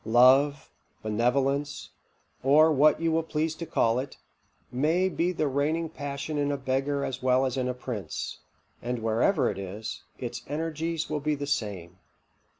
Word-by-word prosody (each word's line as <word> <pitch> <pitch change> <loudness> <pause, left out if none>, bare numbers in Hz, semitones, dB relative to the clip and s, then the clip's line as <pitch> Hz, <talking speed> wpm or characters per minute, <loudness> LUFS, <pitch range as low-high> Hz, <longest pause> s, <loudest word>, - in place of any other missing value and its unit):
Love, 130 +5 +4 0.3
benevolence, 135 +6 0 0.5
or 150 +4 +6
what 150 +1 +4
you 165 0 +1
will 165 +1 +2
please 160 0 -1
to 170 +1 -7
call 115 -5 +2
it, 130 +1 -6 0.5
may 160 +9 +2
be 175 -1 0
the 155 -4 0
reigning 150 +4 0
passion 145 -1 -4
in 145 0 +1
a 140 - -1
beggar 135 +2 -1
as 130 0 -4
well 130 +1 +3
as 130 - -1
in 130 -1 -1
a - - -1
prince; 120 -5 -5 0.4
and 125 +1 -2
wherever 115 - +2
it - - -2
is, 100 +4 -6 0.2
its 120 -1 -5
energies 160 +1 -2
will 150 - -2
be 150 +1 0
the 145 0 -4
same. 95 -9 -3
140 Hz, 160 wpm, -27 LUFS, 125-155 Hz, 0.5 s, or